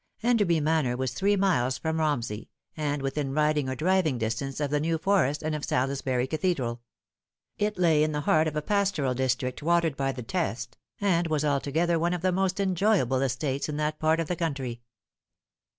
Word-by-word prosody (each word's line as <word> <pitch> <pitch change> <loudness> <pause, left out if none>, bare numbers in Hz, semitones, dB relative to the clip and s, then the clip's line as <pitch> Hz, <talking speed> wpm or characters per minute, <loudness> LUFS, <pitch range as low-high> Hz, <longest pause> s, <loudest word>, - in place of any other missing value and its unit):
Enderby 205 -9 +3
Manor 150 -5 +1
was 130 -2 -2
three 200 +10 +2
miles 170 -11 +1
from 160 0 -2
Romsey, 120 -9 -1 0.3
and 145 -2 -2
within 135 0 -2
riding 150 -2 +2
or 130 - -2
driving 165 -2 +1
distance 115 +5 -3
of 145 -2 -1
the 150 - +2
New 165 +2 0
Forest 160 -6 +1
and 155 0 -1
of 150 -1 -4
Salisbury 130 -1 0
Cathedral. 135 -6 -1 0.8
It 210 0 0
lay 165 -4 +4
in 155 0 +2
the 150 0 -2
heart 155 +1 +3
of 155 - -3
a 150 - -1
pastoral 195 -9 +1
district 125 0 -1
watered 170 -1 +2
by 135 0 0
the 125 -2 -7
Test, 120 -6 -3 0.2
and 175 -4 +2
was 155 -2 0
altogether 155 +4 +1
one 175 +2 +1
of 175 - -6
the 185 - +3
most 190 +1 0
enjoyable 185 - +2
estates 135 +2 -1
in 150 - -3
that 150 0 -1
part 160 +1 +2
of 165 - -1
the 180 - -1
country. 135 -8 -3
150 Hz, 185 wpm, -27 LUFS, 135-170 Hz, 0.8 s, lay